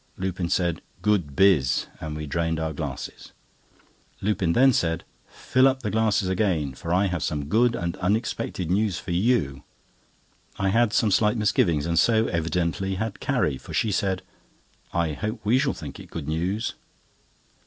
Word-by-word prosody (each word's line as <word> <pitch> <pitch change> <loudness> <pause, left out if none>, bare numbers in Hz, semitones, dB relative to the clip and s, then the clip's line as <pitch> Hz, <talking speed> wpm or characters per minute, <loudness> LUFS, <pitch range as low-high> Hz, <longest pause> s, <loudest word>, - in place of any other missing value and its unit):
Lupin 90 -2 -2
said: 85 -3 0 0.2
"Good 90 -10 +1
biz!" 90 -10 +4
and 75 -1 -5
we 75 - -4
drained 80 +2 -1
our 80 -1 -2
glasses. 70 -3 -6 0.9
Lupin 95 -4 0
then 130 +4 +5
said: 80 -5 0 0.2
"Fill 130 +1 +2
up 130 -1 0
the 105 - -1
glasses 110 -3 +2
again, 90 -8 0
for 85 +6 -6
I 95 +3 +3
have 90 -4 -2
some 75 -1 -2
good 115 +9 +3
and 85 0 -3
unexpected 95 -3 -1
news 100 -1 +1
for 90 - -6
you." 85 - +1 1.0
I 95 - +1
had 115 +2 +3
some 110 -2 +2
slight 105 +3 +3
misgivings, 85 -8 +2
and 85 -1 +2
so 110 -1 +4
evidently 85 +3 -1
had 105 +1 -3
Carrie, 70 -4 0
for - - -8
she 110 - +1
said: 95 -1 0 0.7
"I 85 -3 0
hope 110 +9 -4
we 115 +5 +3
shall 140 0 +1
think 75 -5 -8
it - - -11
good 80 -4 -6
news." 90 +8 -1
95 Hz, 165 wpm, -25 LUFS, 80-105 Hz, 1.0 s, then